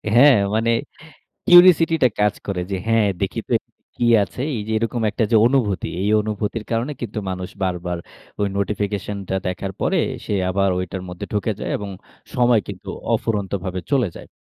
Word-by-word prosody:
হ্যাঁ। 135 0 +8 0.2
মানে 115 +1 +2 0.8
কিউরিওসিটি 175 -2 +7
টা - - +8
কাজ 105 -1 +3
করে। 95 -3 -2
যে, - - 0
হ্যাঁ, 115 -2 +3
দেখি - - -1
তো - - -1 0.4
কি 120 - 0 0.2
আছে। 125 - -6
এই 110 - -3
যে - - -3
এরকম 115 +1 -1
একটা 110 - -1 0.2
অনুভূতি, 120 -7 +1
এই 100 - +1
অনুভূতির 105 +1 -3
কারণে 115 +5 0
কিন্তু 110 -2 -4
মানুষ 90 -1 -4
বারবার 90 -1 -2 0.4
ওই 100 - +2
নোটিফিকেশনটা 100 -1 -2
দেখার 95 +1 -3
পরে - - +1 0.3
সে - - -2 0.2
আবার 100 +1 +2
ঐটার 90 +1 -4
মধ্যে 90 0 -6
ঢুকে 105 +1 0
যায়। - - -3
এবং 100 -1 -6 0.5
সময় 120 -2 +4
কিন্তু - - -8 0.2
অফুরন্ত 105 -4 -1
ভাবে 95 -1 -3
চলে 135 -5 +3
যায়। - - -10
105 Hz, 165 wpm, -21 LUFS, 95-115 Hz, 0.8 s, হ্যাঁ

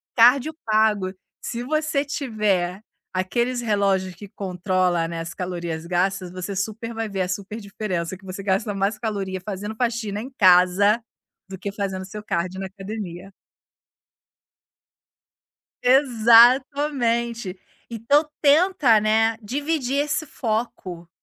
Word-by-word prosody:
Cardio 255 +6 +5
pago, 215 -3 +2 0.3
se 240 0 -4
você 305 +1 0
tiver 210 -9 -1 0.3
aqueles 240 +7 0
relógios 195 -4 +1
que 205 +3 -10
controla 185 -3 -1
né 165 0 -5
as 165 0 -6
calorias 170 -3 -4
gastas 185 +1 0
você 185 +2 -5
super 220 +4 -3
vai 225 -1 -3
ver 195 -1 -2
a 180 - 0
super 200 +4 -4
diferença 190 -4 -4
que 200 - -24
você 190 +1 -7
gasta 200 +2 0
mais 200 +2 -1
caloria 195 -4 -3
fazendo 205 +2 -5
faxina 225 -3 -2
em 260 +3 -8
casa, 185 +4 +5 0.5
do 190 - -7
que 200 +2 -5
fazendo 190 -2 -4
seu 210 +2 -8
cardio 185 0 -2
na 190 - -4
academia. 195 -2 -7 2.5
Exatamente. 235 -3 +4 0.3
Então 280 +7 +2
tenta 295 - +5
né, 220 +1 +2
dividir 280 +3 -2
esse 305 +2 0
foco. 215 - -4
210 Hz, 120 wpm, -23 LUFS, 185-235 Hz, 2.5 s, Cardio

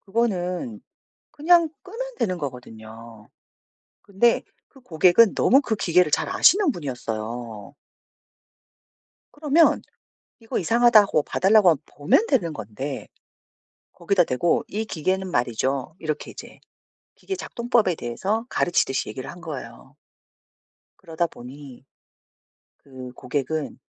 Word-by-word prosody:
그거는 210 0 -2 0.5
그냥 335 +2 +3
끄면 485 +6 -7
되는 185 - -1
거 145 -4 -3
거든요. 115 -2 -13 0.8
근데 205 +4 +2 0.3
그 270 - -20
고객은 185 +1 +4
너무 270 - +4
그 225 -6 -2
기계를 180 -3 +2
잘 150 0 0
아시는 380 - +4
분이었어요. 115 - -6 1.6
그러면 305 +2 +3 0.6
"이거 225 -1 -3
이상하다." 230 +3 +5
하고 175 -7 0
봐 - - -5
달라고 195 0 +5
하면 160 - +3
보면 150 - +1
되는 180 - 0
건데 130 +3 -6 0.9
거기다 175 +1 +1
대고 160 +5 0
"이 215 +2 -3
기계는 185 +2 -2
말이죠." 130 +2 -1
이렇게 155 -2 -4
이제 - - -12 0.6
기계 385 - -5
작동법에 235 - 0
대해서 195 - -3
가르치듯이 150 -6 0
얘기를 130 +4 -7
한 175 - -12
거예요. 135 -4 -9 1.0
그러다 165 +1 -2
보니 135 -1 -12 1.0
그 130 -2 -10
고객은 145 +3 -4
170 Hz, 260 characters per minute, -23 LUFS, -, 1.6 s, 이상하다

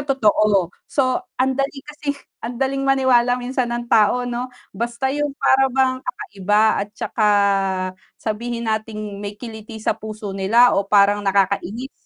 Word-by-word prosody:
totoo, 215 -9 +2 0.2
so 265 +4 +1 0.2
andali 270 +1 -1
kasi 295 -1 -4 0.2
andaling 265 +3 -2
maniwala 250 -2 +3
minsan 250 0 -2
ng 240 0 -3
tao, 235 +2 +3
'no, 245 +1 -3 0.2
basta 240 +3 -2
yung 295 0 0
para 270 -1 +3
bang 260 0 +1
kakaiba 210 - -1 0.2
at 205 - -4
saka 215 -3 0 0.9
sabihin 235 +2 -4
natin 215 -2 -3
may 205 0 -6
kiliti 220 -1 -9
sa 220 - 0
puso 215 -2 -7
nila 220 +6 +4
o 195 0 0
parang 205 0 +4
nakakainis, 200 +5 0
235 Hz, 135 wpm, -21 LUFS, 210-260 Hz, 0.9 s, nila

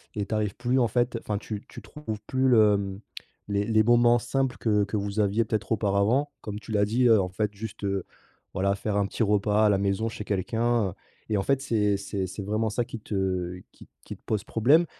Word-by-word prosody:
et 100 -1 -1
tu 110 - -3
arrives 105 -2 -1
plus 125 +2 +1
en 120 - +3
fait, 120 +1 0
enfin 105 -1 -2
tu 105 0 -6
tu - - -10
trouves 110 -9 -7
plus 130 0 +1
le, 105 -4 +5
mmh, 100 0 -5 0.5
les 100 0 0
les 110 -1 +3
moments 120 +1 +5
simples 135 +1 -1
que 105 -3 +2
que 105 +1 -2
vous 100 +1 -3
aviez 105 +2 +2
peut-être 110 +1 -3
auparavant. 110 +7 +2
Comme 105 0 -6
tu 110 - -10
l'as 105 -1 +3
dit, 120 +4 +2
heu, 110 -4 +6
en 90 - -2
fait 105 +2 -2
juste, 105 0 -8
heu, 100 -2 -1 0.5
voilà, 100 +1 +1
faire 105 0 -2
un 100 - +2
petit 105 - -5
repas 105 +1 +2
à - - +4
la 100 - +3
maison 100 +3 0
chez 105 - -6
quelqu'un, 115 +2 0
heu, - - -8 0.4
et 105 - +1
en 95 - 0
fait, 135 +2 +1
c'est 105 -6 +1
c'est 100 -1 -3
c'est 100 - -7
vraiment 110 +2 0
ça 120 +3 0
qui 115 -1 -8
te 95 -3 -2
qui - - -16
t - - -34
qui - - -8
te - - -37
pose 105 -2 -1
problème, 145 +10 +4
105 Hz, 235 wpm, -26 LUFS, 100-115 Hz, 0.5 s, heu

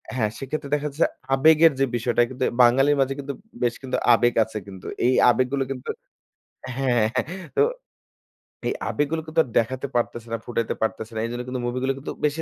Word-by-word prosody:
হ্যাঁ, 110 -4 +1
সেক্ষেত্রে 140 +2 -4
দেখা 150 0 -2
যাচ্ছে 145 +4 +1 0.3
আবেগের 160 +3 +6
যে 135 - +4
বিষয়টা 120 0 +1
কিন্তু 130 0 -4 0.2
বাঙালির 135 +4 +5
মাঝে 135 0 +1
কিন্তু 140 0 -4 0.3
বেশ 120 -1 +1
কিন্তু 130 - -1 0.2
আবেগ 120 +1 +3
আছে 110 0 -7
কিন্তু 95 -2 -11 0.2
এই 125 - +4 0.2
আবেগ 125 +1 +3
গুলো 140 -1 +1
কিন্তু 130 -2 -6 0.9
হ্যাঁ, 130 -2 +1 0.2
হ্যাঁ, 130 - +2
হ্যাঁ 185 -1 -7
তো - - +5 1.1
এই - - 0 0.2
আবেগগুলো 150 +2 -1
কিন্তু 160 +1 -1
আর - - -14
দেখাতে 130 +4 -2
পারতেছে 120 -1 -1
না, 115 - 0
ফুটাইতে 115 -2 -2
পারতেছে 110 0 -2
না। - - -2
এইজন্য 120 +1 -4
কিন্তু 125 0 -3
মুভিগুলো 130 +2 -1
কিন্তু 135 - -6
বেশি 150 +2 0
130 Hz, 190 wpm, -24 LUFS, 120-140 Hz, 1.1 s, আবেগের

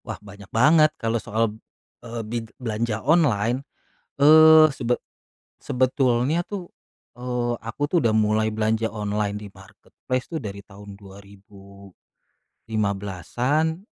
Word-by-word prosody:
Wah, - - -6
banyak 100 -1 -14
banget 155 +7 +5
kalau 115 -1 -2
soal, 110 0 -1 0.5
eee, 115 -1 -6
bi 115 +3 -4 0.2
belanja 110 -2 -3
online, 130 -7 +2 0.6
eee, 155 +1 +8
sebet 125 -3 -2 0.6
sebetulnya 130 +3 +1
tuh, 190 -4 -7 0.5
eee, 125 -1 -2
aku 115 +5 -7
tuh 160 +5 +1
udah 115 -5 +2
mulai 110 0 +2
belanja 110 +1 0
online 105 -1 -3
di 105 -1 -9
marketplace 100 +6 -7
tuh 160 - -3
dari 100 -2 -8
tahun 100 0 -13
2015-an, 100 - -5
115 Hz, 110 wpm, -23 LUFS, 105-130 Hz, 0.6 s, eee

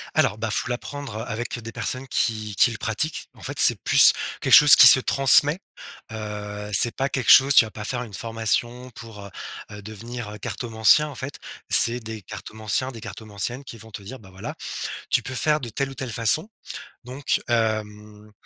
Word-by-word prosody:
Alors, 105 - +1
bah, 110 +1 -4
il - - 0
faut - - -3
l'apprendre, 135 0 -7
heu, - - -6
avec 120 +2 -6
des 115 -1 -10
personnes 130 +3 -5
qui 110 -4 -2
qui 120 - +3
le 115 - -7
pratiquent. 145 +8 -4
En - - -20
fait, - - -7
c'est - - +6
plus - - +5 0.3
quelque - - -1
chose 150 -1 +9
qui - - +7
se - - +8
transmet. 140 +4 +2 0.5
Heu, 105 -1 -8
c'est 105 +4 +6
pas 135 +1 -2
quelque 130 -3 0
chose 140 +1 +6
tu - - +6
vas 110 - -11
pas 105 - -9
faire 125 +2 -4
une 110 -4 -13
formation 115 +4 -3
pour, 110 -3 -12
heu, - - -11 0.4
heu, 105 0 -10
devenir 110 +1 -9
cartomancien 115 +7 +1
en 145 - -10
fait. 140 +2 -8 0.3
C'est 120 +1 +7
des 110 -2 -9
cartomanciens, 110 +6 -5
des 115 -3 -12
cartomanciennes, 110 +2 -7
qui 120 - -12
vont 110 0 -14
te 105 - -10
dire: 130 +6 -10
«Bah 95 - -17
voilà, 95 0 -9 0.6
tu - - +1
peux 130 - -8
faire 150 +4 0
de 125 - -7
telle 135 +5 -4
ou - - -11
telle 130 -2 -7
façon». 115 - -1 0.5
Donc 130 +3 -3
hem, 105 -2 -4
115 Hz, 200 wpm, -22 LUFS, 105-130 Hz, 0.6 s, chose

